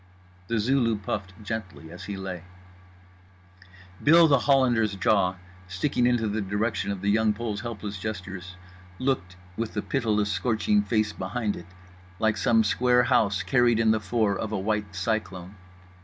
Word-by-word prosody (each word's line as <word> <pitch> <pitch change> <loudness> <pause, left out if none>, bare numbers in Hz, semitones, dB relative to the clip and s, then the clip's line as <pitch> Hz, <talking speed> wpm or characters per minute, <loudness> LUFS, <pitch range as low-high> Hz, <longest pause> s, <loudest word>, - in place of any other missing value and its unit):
The 115 - 0
Zulu 115 +1 +2
puffed 100 -1 -4
gently 95 -6 -6
as 90 - -9
he 100 -1 -5
lay. 95 -3 -5 1.6
Bill 165 +3 +7
The 140 -3 +4
Hollander's 120 -7 +2
jaw, 95 -2 +2 0.3
sticking 120 +7 0
into 120 -3 +1
the 105 +1 -1
direction 105 +3 -1
of 100 -2 -3
The 100 +1 +1
Young 110 0 +3
Pole's 105 -1 -4
helpless 105 -4 -6
gestures, 95 -3 -6 0.4
looked 130 -9 -1 0.2
(with 115 +1 -4
the 105 - -1
pitiless 105 -6 0
scorching 120 - +1
face 110 - 0
behind 105 +3 -3
it) 85 - -10 0.5
like 110 +2 +1
some 115 +2 +3
square 125 +3 +3
house 100 -4 +2
carried 120 -3 +3
in 110 -1 +4
the 110 - +2
fore 105 0 0
of 110 +1 -4
a 110 - -1
white 105 0 -2
cyclone. 95 -2 -3
110 Hz, 155 wpm, -26 LUFS, 95-120 Hz, 1.6 s, Bill